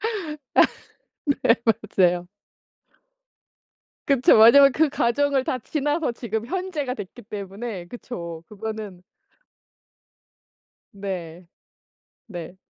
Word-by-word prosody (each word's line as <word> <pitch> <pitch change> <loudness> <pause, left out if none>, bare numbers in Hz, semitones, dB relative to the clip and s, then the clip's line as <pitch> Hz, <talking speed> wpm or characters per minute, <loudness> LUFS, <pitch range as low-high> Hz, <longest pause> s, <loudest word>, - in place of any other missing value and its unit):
아 445 - -1 1.4
네 230 -2 +6
맞아요. 185 -5 +2 1.8
그쵸. 265 -5 +5
왜냐면 275 +5 +8
그 315 +2 +3
과정을 275 +2 +1
다 255 - -1
지나서 295 +2 -1
지금 225 -2 -4
현재가 350 -8 -3
됐기 215 +2 -9
때문에. 200 -1 -6
그쵸. 170 -7 -8
그거는 210 -3 -7 1.9
네. 180 -4 -6 0.8
네. 175 -2 -8
220 Hz, 165 characters per minute, -24 LUFS, 190-265 Hz, 1.9 s, 왜냐면